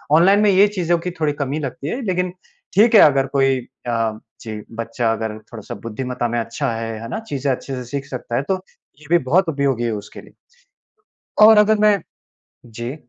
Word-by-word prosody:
Online 195 Hz, +5 st, +5 dB
में 210 Hz, -, +4 dB
ये 195 Hz, +2 st, +6 dB
चीज़ों 175 Hz, -2 st, +1 dB
की 180 Hz, +2 st, -4 dB
थोड़ी 150 Hz, -2 st, +1 dB
कमी 145 Hz, +1 st, -3 dB
लगती 140 Hz, 0 st, -5 dB
है। 260 Hz, -, -3 dB
लेकिन 180 Hz, -2 st, 0 dB, 0.5 s
ठीक 220 Hz, +3 st, +5 dB
है -, -, +9 dB
अगर 135 Hz, -2 st, +5 dB
कोई 135 Hz, -1 st, +3 dB, 0.3 s
अ, 115 Hz, -2 st, -1 dB, 0.2 s
जी 110 Hz, -2 st, -6 dB, 0.2 s
बच्चा 115 Hz, 0 st, -1 dB
अगर 110 Hz, -1 st, -4 dB, 0.2 s
थोड़ा-सा 110 Hz, -3 st, -7 dB
बुद्धिमत्ता 125 Hz, +2 st, -3 dB
में 120 Hz, -, -1 dB
अच्छा 115 Hz, +4 st, -2 dB
है, 115 Hz, 0 st, -4 dB
है 115 Hz, -, -7 dB
ना? 220 Hz, -, -3 dB
चीज़ें 140 Hz, -, -2 dB
अच्छे 135 Hz, +1 st, -4 dB
से 125 Hz, -, -5 dB
सीख 140 Hz, +3 st, -5 dB
सकता 125 Hz, -2 st, -5 dB
है, 135 Hz, -, 0 dB
तो 185 Hz, +4 st, -2 dB, 0.4 s
ये -, -, -15 dB
भी 175 Hz, -, +7 dB
बहुत 170 Hz, +7 st, +3 dB
उपयोगी 140 Hz, -5 st, 0 dB
है 115 Hz, -, 0 dB
उसके 105 Hz, -1 st, -8 dB
लिए। -, -, -18 dB, 1.1 s
और 215 Hz, 0 st, +8 dB
अगर 210 Hz, +1 st, +5 dB
मैं 210 Hz, -2 st, +4 dB, 0.7 s
जी। 120 Hz, +3 st, -6 dB
135 Hz, 195 wpm, -20 LUFS, 120-180 Hz, 1.1 s, है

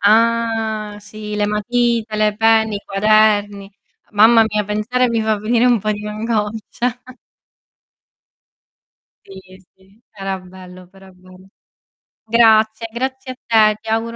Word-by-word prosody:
Ah, 220 Hz, -1 st, +1 dB
sì! 210 Hz, 0 st, -9 dB
Le 210 Hz, 0 st, 0 dB
matite, 225 Hz, +1 st, -1 dB
le 215 Hz, -1 st, +1 dB
penne, 220 Hz, -1 st, +2 dB
i 200 Hz, -, -9 dB
quaderni. 205 Hz, -1 st, +1 dB, 0.4 s
Mamma 225 Hz, +2 st, +5 dB
mia, 210 Hz, -1 st, -2 dB
pensare 220 Hz, +5 st, -1 dB
mi 230 Hz, -1 st, -1 dB
fa 220 Hz, -1 st, 0 dB
venire 230 Hz, +3 st, +1 dB
un 245 Hz, -2 st, +3 dB
po' 215 Hz, +2 st, -2 dB
di 210 Hz, 0 st, -7 dB
angoscia. 215 Hz, 0 st, -3 dB, 2.6 s
Sì, 190 Hz, -1 st, -14 dB, 0.2 s
sì, 195 Hz, +4 st, -27 dB
era 195 Hz, -2 st, -5 dB
bello, 185 Hz, 0 st, -14 dB
però 195 Hz, +1 st, -18 dB
è 190 Hz, -, -17 dB
vero. 185 Hz, +1 st, -18 dB, 0.8 s
Grazie, 220 Hz, 0 st, +3 dB
grazie 260 Hz, +1 st, -4 dB
a -, -, -20 dB, 0.4 s
te. -, -, -13 dB
Ti 225 Hz, -, -9 dB
auguro 225 Hz, +1 st, -2 dB
215 Hz, 130 wpm, -18 LUFS, 205-225 Hz, 2.6 s, Mamma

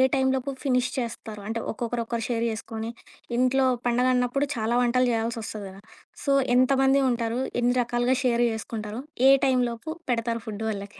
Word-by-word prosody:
టైంలోపు 265 Hz, 0 st, 0 dB
finish 255 Hz, -2 st, +2 dB
చేస్తారు? 225 Hz, -4 st, -5 dB
అంటే 230 Hz, +1 st, -2 dB
ఒక్కొక్కరు 235 Hz, +1 st, -2 dB
ఒకరు 230 Hz, -1 st, -2 dB
షేర్ 235 Hz, -1 st, 0 dB
చేసుకొని, 220 Hz, +1 st, -5 dB, 0.5 s
ఇంట్లో 260 Hz, +1 st, +3 dB, 0.2 s
పండుగన్నప్పుడు 250 Hz, +3 st, +2 dB
చాలా 225 Hz, +1 st, 0 dB
వంటలు 250 Hz, +1 st, +2 dB
జేయాల్సొస్తది 225 Hz, -2 st, -3 dB
కదా! 195 Hz, +1 st, -13 dB, 0.4 s
సో 280 Hz, -, +3 dB, 0.2 s
ఎంతమంది 270 Hz, +1 st, +4 dB
ఉంటారు? 235 Hz, 0 st, -1 dB, 0.2 s
ఎన్ని 245 Hz, +1 st, +2 dB
రకాలుగా 240 Hz, +2 st, +1 dB
షేర్ 240 Hz, -1 st, +3 dB
జేసుకుంటారు? 220 Hz, 0 st, -5 dB, 0.3 s
ఏ -, -, +9 dB
టైంలోపు 250 Hz, 0 st, 0 dB, 0.2 s
పెడతారు 230 Hz, -1 st, -1 dB
ఫుడ్ 215 Hz, 0 st, -5 dB
వాళ్ళకి? 200 Hz, -1 st, -6 dB
240 Hz, 140 wpm, -26 LUFS, 225-255 Hz, 0.5 s, ఏ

